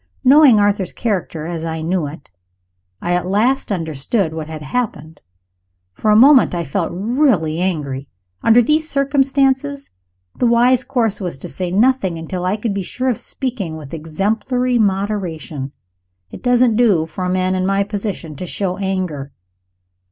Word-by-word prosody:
Knowing 270 -4 +7
Arthur's 205 -2 +1
character 180 -8 -2
as 165 -1 -4
I 160 -1 -3
knew 170 -2 0
it, 145 - -11 0.7
I 175 - 0
at 180 0 0
last 225 +7 +1
understood 160 - -1
what 160 -1 -5
had 155 -1 -7
happened. 160 - -4 0.7
For 215 - -1
a 210 - +6
moment 260 -3 +6
I 170 -1 -2
felt 165 +4 -2
really 195 - +1
angry. 145 -7 -2 0.3
Under 235 +2 +5
these 310 +5 +1
circumstances, 275 0 +1 0.4
the 245 - +1
wise 240 +2 +4
course 225 -5 -1
was 180 -7 -4
to - - -8
say 180 -1 -4
nothing, 200 -2 +2
until 175 +3 -5
I 190 +3 0
could 215 -1 -2
be 200 - -2
sure 255 +8 -2
of 240 - 0
speaking 230 - -4
with 150 -2 -10
exemplary 220 - -1
moderation. 190 -9 -2 0.6
It - - -9
doesn't 245 -2 +3
do 205 -10 +3
for 165 +3 -6
a 180 - -1
man 185 0 +1
in 185 0 0
my 195 0 +2
position 200 -6 -5
to 180 - -5
show 185 0 -3
anger. 185 -8 -3
195 Hz, 160 wpm, -18 LUFS, 165-240 Hz, 0.7 s, Knowing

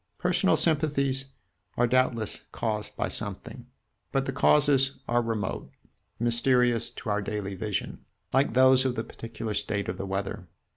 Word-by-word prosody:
Personal 180 +1 +2
sympathies 140 -4 +1 0.5
are 120 - +4
doubtless 120 -3 +1
caused 105 -2 -3
by 120 - 0
something; 110 +4 -4 0.4
but 135 -1 0
the 135 - -2
causes 135 -1 +4
are 120 0 +2
remote, 110 -4 -3 0.5
mysterious 120 0 +2
to 110 - -5
our 105 0 +1
daily 100 -1 -4
vision, 100 +1 -4 0.3
like 135 -3 +2
those 130 0 +6
of 130 -2 0
the 110 - -2
particular 115 -1 -6
state 100 0 -2
of 90 +1 -4
the 100 - -4
weather. 95 0 -4
120 Hz, 145 wpm, -27 LUFS, 105-135 Hz, 0.5 s, those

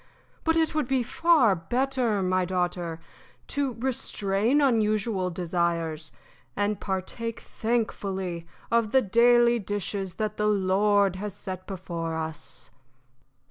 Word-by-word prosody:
But 325 0 +2
it 320 -1 +2
would 305 -5 0
be 265 -2 +1
far 265 - +4
better, 240 +3 0
my 185 0 +2
daughter, 175 -2 -2 0.5
to 280 -3 -1
restrain 230 -1 0
unusual 215 -7 +1
desires, 170 -3 -1 0.4
and 205 +1 0
partake 205 +4 -3
thankfully 190 -7 -2 0.2
of 230 -2 +2
the 265 -1 +5
daily 235 +3 +5
dishes 200 -2 -3
that 215 -1 -3
the 210 - +1
Lord 200 -1 +3
has 205 0 -5
set 185 -2 -7
before 170 -4 -4
us." 160 -1 -7
205 Hz, 115 wpm, -27 LUFS, 185-235 Hz, 0.5 s, the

